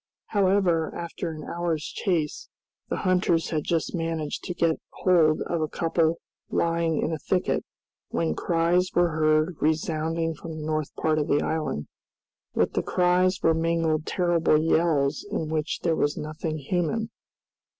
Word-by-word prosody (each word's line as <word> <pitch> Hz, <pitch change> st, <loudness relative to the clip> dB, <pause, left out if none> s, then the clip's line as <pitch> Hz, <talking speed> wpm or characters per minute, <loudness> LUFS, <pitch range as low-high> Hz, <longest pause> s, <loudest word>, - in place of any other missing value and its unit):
However, 190 Hz, -5 st, +2 dB
after 170 Hz, 0 st, -4 dB
an 155 Hz, -1 st, -7 dB
hour's 170 Hz, -2 st, -2 dB
chase, 165 Hz, -6 st, -2 dB, 0.4 s
the -, -, 0 dB
hunters 180 Hz, -3 st, +2 dB
had 155 Hz, -3 st, 0 dB
just 165 Hz, -2 st, 0 dB
managed 165 Hz, -3 st, -2 dB
to 180 Hz, -, -4 dB
get 165 Hz, -2 st, +1 dB
hold 165 Hz, -4 st, +3 dB
of 170 Hz, -2 st, -2 dB
a 155 Hz, -, +1 dB
couple 165 Hz, +1 st, +1 dB, 0.3 s
lying 165 Hz, -1 st, +1 dB
in 160 Hz, -, 0 dB
a 155 Hz, -, -3 dB
thicket, 180 Hz, +5 st, 0 dB, 0.5 s
when 80 Hz, -2 st, 0 dB
cries 170 Hz, -, +1 dB
were 175 Hz, 0 st, +4 dB
heard 155 Hz, +1 st, +2 dB
resounding 160 Hz, +1 st, 0 dB
from 160 Hz, +1 st, -8 dB
the 155 Hz, -, -5 dB
north 155 Hz, -2 st, -1 dB
part 155 Hz, -1 st, +1 dB
of 150 Hz, -, -1 dB
the 145 Hz, -, +2 dB
island, 155 Hz, -, -2 dB, 0.7 s
With -, -, +2 dB
the -, -, +1 dB
cries 180 Hz, +1 st, +2 dB
were 165 Hz, -, +5 dB
mingled 165 Hz, -1 st, 0 dB
terrible 175 Hz, -4 st, +2 dB
yells, 155 Hz, -3 st, +2 dB
in 165 Hz, -7 st, -2 dB
which 155 Hz, 0 st, -2 dB
there 165 Hz, -2 st, +2 dB
was 145 Hz, -1 st, 0 dB
nothing 155 Hz, +1 st, -4 dB
human. 180 Hz, +9 st, -1 dB
165 Hz, 150 wpm, -26 LUFS, 155-175 Hz, 0.7 s, were